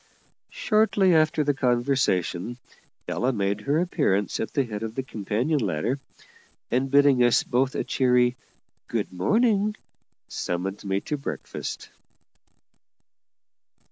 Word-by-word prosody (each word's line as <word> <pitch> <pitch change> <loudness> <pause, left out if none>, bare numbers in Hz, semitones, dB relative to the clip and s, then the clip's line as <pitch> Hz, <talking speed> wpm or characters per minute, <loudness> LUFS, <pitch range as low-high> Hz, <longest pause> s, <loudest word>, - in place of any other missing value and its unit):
Shortly 215 - +2
after 155 -1 +3
the 145 0 +1
conversation 120 -6 0 0.5
Ella 125 +2 0
made 100 -2 -1
her 145 +7 +1
appearance 140 - 0
at 110 - -3
the 140 - +1
head 110 -4 -6
of 115 0 -5
the 135 - -2
companion 120 +6 -1
ladder, 105 - -1 0.7
and, 130 +2 +1
bidding 140 -2 +5
us 120 -1 +4
both 130 +2 0
a - - -1
cheery 125 -1 +2 0.5
"Good - - -3
morning," 210 - +2 0.5
summoned 95 +4 -4
me 95 0 -1
to 150 - -3
breakfast. 140 - -6
125 Hz, 115 wpm, -25 LUFS, 105-145 Hz, 0.7 s, bidding